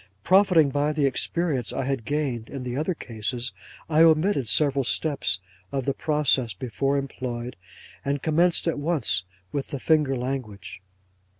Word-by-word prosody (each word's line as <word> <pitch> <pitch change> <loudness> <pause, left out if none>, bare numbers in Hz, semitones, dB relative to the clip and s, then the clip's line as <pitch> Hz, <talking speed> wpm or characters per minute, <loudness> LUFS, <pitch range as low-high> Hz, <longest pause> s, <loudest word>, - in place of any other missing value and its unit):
'Profiting 185 -6 +5
by 145 +1 +1
the 150 -2 +1
experience 135 -2 0
I 135 - -2
had 135 -4 -2
gained 135 -6 -2
in 135 -2 -6
the 125 -1 -4
other 160 +6 -1
cases, 120 0 -4 0.4
I 160 0 +3
omitted 160 - +4
several 140 +2 +2
steps 140 -6 +1 0.3
of 135 -2 -2
the 140 - +1
process 135 - +1
before 135 +6 -1
employed, 125 -3 -4 0.5
and 140 +1 -1
commenced 165 +4 +2
at 165 - 0
once 140 - +1 0.3
with 140 -2 -3
the 140 - -5
finger 150 -2 +2
language. 125 -7 -5
140 Hz, 145 wpm, -25 LUFS, 125-155 Hz, 0.5 s, Profiting